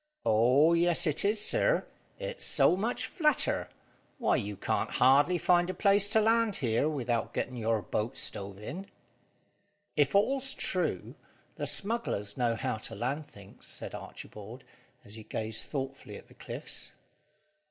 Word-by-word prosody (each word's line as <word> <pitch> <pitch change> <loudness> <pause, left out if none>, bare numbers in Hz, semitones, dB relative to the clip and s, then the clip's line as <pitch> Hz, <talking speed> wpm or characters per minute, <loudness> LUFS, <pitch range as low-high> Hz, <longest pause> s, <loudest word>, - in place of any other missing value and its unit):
"Oh, 125 +9 +4
yes 170 +1 +4
it 155 -2 +2
is, 210 +2 +1
sir. - - +2 0.3
It's - - -5
so - - +4
much 220 +6 -2
flatter. 305 -4 +1 0.5
Why, 235 - +2
you 105 -4 -3
can't - - -1
hardly 140 +8 +4
find 175 +1 +3
a 185 - -3
place 200 0 +4
to 220 +1 +4
land 225 -1 +2
here, 120 +3 +1
without 120 -6 -2
getting 130 - -2
your 110 -2 0
boat 110 +7 -3
stove 100 -1 -4
in." 150 - -7 1.1
"If 145 +1 +2
all's 270 +6 +1
true, - - -1 0.4
the - - -4
smugglers 200 - -1
know 120 -2 +1
how 110 - -2
to 110 +1 -4
land 140 +7 -3
things," 100 -1 -13
said - - -7
Archibald, 110 +5 -9 0.4
as 100 - -8
he 110 0 -8
gazed 110 +1 -1
thoughtfully 135 -1 -5
at - - -13
the - - -16
cliffs. - - -6
145 Hz, 150 wpm, -30 LUFS, -, 1.1 s, Oh